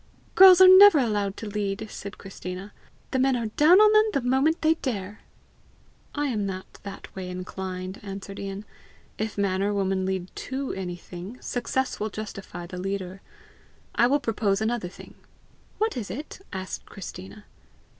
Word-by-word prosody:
"Girls 375 -1 +9
are 375 - +10
never 375 -1 +9
allowed 205 -6 0
to - - -6
lead!" 205 0 -3
said 200 0 -8
Christina. 190 +1 -8 0.4
"The 260 - 0
men 265 0 +3
are 230 -3 -2
down 335 +6 +7
on 425 0 +6
them 430 0 +6
the 250 -3 -1
moment 275 +6 +2
they 315 +1 +5
dare!" 210 -9 -5 1.0
"I 290 0 0
am 225 -7 -1
not 190 -1 -6
that 200 -1 -10
way 185 -1 -5
inclined," 185 +1 -6
answered 195 0 -7
Ian. 195 +1 -6 0.5
"If 215 0 -3
man 195 -2 0
or 205 +1 0
woman 190 -1 0
lead 190 -1 -3
TO 270 +1 -4
anything, 180 +4 -7
success 260 +1 -2
will 215 - -2
justify 200 -4 -7
the 180 +1 -7
leader. 195 -1 -4 0.7
I 240 - +4
will 285 +3 +2
propose 215 -5 0
another 220 -4 -1
thing!" - - -13 0.6
"What 440 +1 0
is 225 -7 -4
it?" 285 - -7
asked 190 -1 -6
Christina. 195 +2 -9
205 Hz, 160 wpm, -26 LUFS, 190-260 Hz, 1.0 s, are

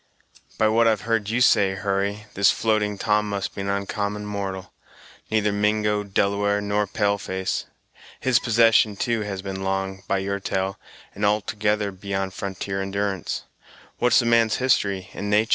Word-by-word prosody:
"By 110 - +3
what 115 +1 +4
I've 110 -3 +2
heard 115 -3 0
you 120 +3 0
say, 100 -6 +4
Hurry, 100 +2 -2
this 100 0 +4
Floating 105 -2 +1
Tom 105 +1 +1
must 100 -1 -3
be 100 - -5
an 100 - -3
oncommon 100 +1 -2
mortal; 100 -2 -5 0.6
neither 105 -1 +2
Mingo, 105 0 +1
Delaware, 100 +1 +1
nor 105 0 0
pale 100 0 0
face. 95 0 -3 0.5
His 130 -2 +3
possession, 115 -2 +4
too, 115 +2 -1
has 100 -2 -4
been 95 -1 -5
long, 95 0 -2
by 100 - +1
your 100 +1 -2
tell, 95 0 -2 0.3
and 105 - -6
altogether 105 0 +1
beyond 95 0 -4
frontier 95 0 -4
endurance. 100 0 -2 0.6
What's 125 -1 +4
the 120 - +3
man's 115 -1 +3
history 100 -7 +1
and 105 - -4
natur'?" 105 +2 +3
100 Hz, 160 wpm, -24 LUFS, 95-105 Hz, 0.6 s, what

